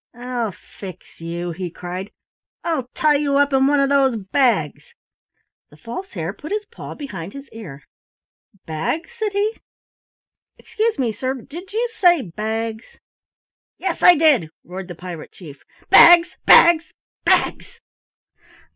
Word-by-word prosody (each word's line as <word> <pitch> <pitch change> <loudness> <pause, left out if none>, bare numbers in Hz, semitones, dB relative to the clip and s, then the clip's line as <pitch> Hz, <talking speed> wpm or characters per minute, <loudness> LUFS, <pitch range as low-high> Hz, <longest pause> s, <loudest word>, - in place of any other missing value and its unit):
"I'll 245 -3 -3 0.3
fix 185 -4 -11
you," 170 +1 -4
he 180 +1 -5
cried, 180 +3 -7 0.5
"I'll 310 -7 -2
tie 300 -2 +3
you 285 -1 0
up 285 0 +2
in 265 0 +4
one 290 0 +3
of 275 0 +2
those 270 -3 +3
bags!" 205 - -1 0.7
The 150 - -19
False 240 - -8
Hare 170 -1 -4
put 305 - -10
his 420 0 -2
paw - - -10
behind 195 - -7
his 275 0 -10
ear. 160 -12 -10 0.8
"Bags?" 160 - -3
said 440 -4 -3
he. 420 +3 -1 1.0
"Excuse 445 +1 -2
me, 250 -4 0
sir, 255 +5 -3
but 250 - -13
did 355 +6 -9
you 460 +3 0
say 350 -8 +4
bags?" 220 +4 -5 0.8
"Yes, 370 -3 -3
I 355 - +8
did," 290 - +3
roared 185 +1 -8
the 175 - -8
Pirate 175 -2 -9
Chief. 150 -6 -13 0.3
"Bags! 345 0 +8
Bags! 340 -1 +6 0.3
Bags!" - - 0
255 Hz, 140 wpm, -20 LUFS, -, 1.0 s, I